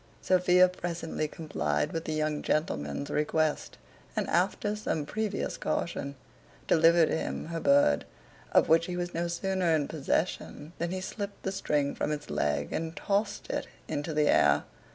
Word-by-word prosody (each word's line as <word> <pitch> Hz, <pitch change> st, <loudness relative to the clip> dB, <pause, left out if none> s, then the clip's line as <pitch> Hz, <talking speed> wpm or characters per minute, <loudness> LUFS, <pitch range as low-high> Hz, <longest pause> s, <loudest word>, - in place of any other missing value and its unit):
Sophia 180 Hz, 0 st, +5 dB
presently 170 Hz, -3 st, -3 dB
complied 75 Hz, -, -2 dB
with 165 Hz, 0 st, -3 dB
the 155 Hz, -, -2 dB
young 155 Hz, -1 st, -1 dB
gentleman's 75 Hz, -, -1 dB
request, 155 Hz, 0 st, 0 dB, 0.4 s
and -, -, 0 dB
after 195 Hz, +4 st, +1 dB
some 160 Hz, -8 st, -2 dB
previous 215 Hz, +3 st, -2 dB
caution, 140 Hz, -4 st, -2 dB, 0.5 s
delivered 165 Hz, 0 st, +5 dB
him -, -, -2 dB
her 165 Hz, 0 st, -3 dB
bird; 140 Hz, -, +4 dB, 0.5 s
of -, -, +5 dB
which 165 Hz, +1 st, +4 dB
he 180 Hz, -1 st, -3 dB
was 175 Hz, 0 st, -3 dB
no 170 Hz, +1 st, -1 dB
sooner 175 Hz, -1 st, +1 dB
in 145 Hz, -2 st, 0 dB
possession, 160 Hz, +1 st, -2 dB
than 170 Hz, -, -1 dB
he 185 Hz, +1 st, -3 dB
slipt 200 Hz, +1 st, -6 dB
the 190 Hz, -, -1 dB
string 150 Hz, -7 st, 0 dB
from -, -, -2 dB
its 150 Hz, -1 st, -4 dB
leg 75 Hz, 0 st, 0 dB
and 160 Hz, 0 st, -3 dB
tossed 205 Hz, +1 st, -1 dB
it -, -, -2 dB, 0.2 s
into 150 Hz, +1 st, -3 dB
the 150 Hz, -1 st, +2 dB
air. -, -, +4 dB
165 Hz, 155 wpm, -29 LUFS, 150-180 Hz, 0.5 s, Sophia